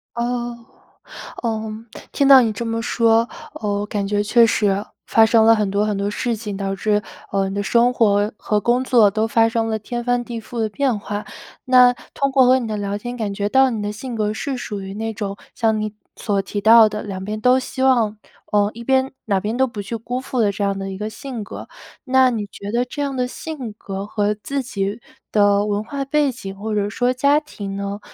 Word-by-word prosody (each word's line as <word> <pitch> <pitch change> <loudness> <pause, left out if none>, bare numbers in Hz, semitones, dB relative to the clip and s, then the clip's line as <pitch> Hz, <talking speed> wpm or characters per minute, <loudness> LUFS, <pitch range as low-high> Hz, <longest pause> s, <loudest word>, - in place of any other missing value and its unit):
哦， 240 0 -2 0.9
嗯， 220 0 -3 0.2
听 280 - +2
到 270 -1 +10
你 225 -3 +1
这 235 - -4
么 230 0 -2
说， 230 0 +2 0.3
哦， 205 -1 -2
我 - - -2
感 200 -2 -2
觉 205 0 +1
确 230 +2 +5
实 215 -2 +1 0.4
发 225 0 +5
生 225 0 +4
了 225 0 +6
很 210 -2 0
多 205 +1 +1
很 210 -2 -1
多 200 0 -1
事 235 +1 -1
情， 210 -2 -6
导 195 0 -2
致， 210 +2 +1 0.3
啊， 195 -1 +1
你 195 - -5
的 205 - -1
生 235 +4 +3
活 205 -3 +2
和 210 -1 0
工 245 +4 +2
作 235 -6 +5
都 220 +2 0
发 225 0 +3
生 225 0 0
了 220 0 -1
天 240 +3 -5
翻 245 0 +1
地 235 -1 -6
覆 230 +1 -7
的 220 -1 0
变 255 -3 0
化。 205 0 -5 0.4
那 250 -1 +7 0.2
通 275 0 0
过 265 -2 +5
和 260 +1 +5
你 235 - -4
的 215 -1 -3
聊 200 0 -3
天， 245 +4 -6
感 210 -3 -2
觉 205 +1 -2
到 265 +1 +4
你 215 -2 -3
的 205 0 -2
性 240 +4 -7
格 215 -1 0
是 265 +5 -3
属 205 -5 -5
于 195 0 -7
那 225 +2 -3
种 200 -2 -4 0.2
像 220 -2 +1
你 215 0 -4 0.2
所 200 -2 -1
提 205 +1 -4
到 225 0 +8
的， 210 0 -4
两 190 -2 -6
边 215 +1 -4
都 250 +2 +5
希 260 0 -4
望 235 -5 +3 0.4
呃， 205 0 +3
一 235 - -8
边 265 +1 +2
哪 200 -3 +1
边 215 +5 -3
都 265 - +4
不 215 -5 -6
去 230 +4 -5
辜 245 +3 -4
负 255 -1 -4
的 205 -2 +3
这 200 +1 -4
样 200 -1 0
的 195 0 -4
一 - - -5
个 215 +1 -3
性 240 -1 -7
格。 - - -9 0.4
那 260 -1 +4
你 220 -4 -2
觉 200 0 -8
得 240 +1 +1
这 290 +3 -6
样 275 -2 -2
的 250 0 0
性 260 -6 -7
格， 195 -1 -6
和 210 0 0
自 275 +6 -3
己 215 -3 -3 0.3
的 205 -1 +3
文 205 0 -1
化 275 +4 -4
背 290 0 +2
景， 195 -6 -8
或 210 +2 -4
者 205 0 +1
说 245 +4 0
家 280 +4 +3
庭 200 -10 -7
呢， 200 +1 -4
220 Hz, 245 characters per minute, -20 LUFS, 205-245 Hz, 0.9 s, 到